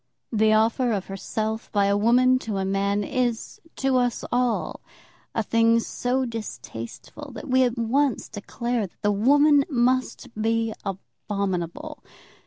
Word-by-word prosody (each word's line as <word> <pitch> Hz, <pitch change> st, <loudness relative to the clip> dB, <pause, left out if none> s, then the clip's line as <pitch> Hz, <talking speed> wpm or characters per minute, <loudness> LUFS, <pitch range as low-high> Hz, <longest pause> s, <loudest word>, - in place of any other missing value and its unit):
The 220 Hz, -1 st, +3 dB
offer 225 Hz, +3 st, +2 dB
of 195 Hz, -3 st, -2 dB
herself 220 Hz, +3 st, -4 dB
by 200 Hz, -1 st, +2 dB
a 200 Hz, 0 st, +2 dB
woman 250 Hz, +4 st, +4 dB
to 215 Hz, -5 st, -4 dB
a 190 Hz, -, -1 dB
man 200 Hz, +1 st, 0 dB
is, 240 Hz, +1 st, -2 dB
to 270 Hz, -1 st, +1 dB
us 245 Hz, -1 st, 0 dB
all, 245 Hz, -1 st, 0 dB, 0.5 s
a 225 Hz, -, +1 dB
thing 230 Hz, +1 st, +3 dB
so 250 Hz, +3 st, -1 dB
distasteful 225 Hz, -, -8 dB
that -, -, -8 dB
we 260 Hz, 0 st, +3 dB
at 245 Hz, -1 st, +1 dB
once 255 Hz, +3 st, +1 dB
declare 235 Hz, +1 st, -3 dB
that -, -, -30 dB
the 205 Hz, -, +3 dB
woman 285 Hz, +7 st, +5 dB
must 255 Hz, 0 st, 0 dB
be 225 Hz, +1 st, 0 dB
abominable. 195 Hz, -, -4 dB
230 Hz, 140 wpm, -24 LUFS, 205-255 Hz, 0.5 s, woman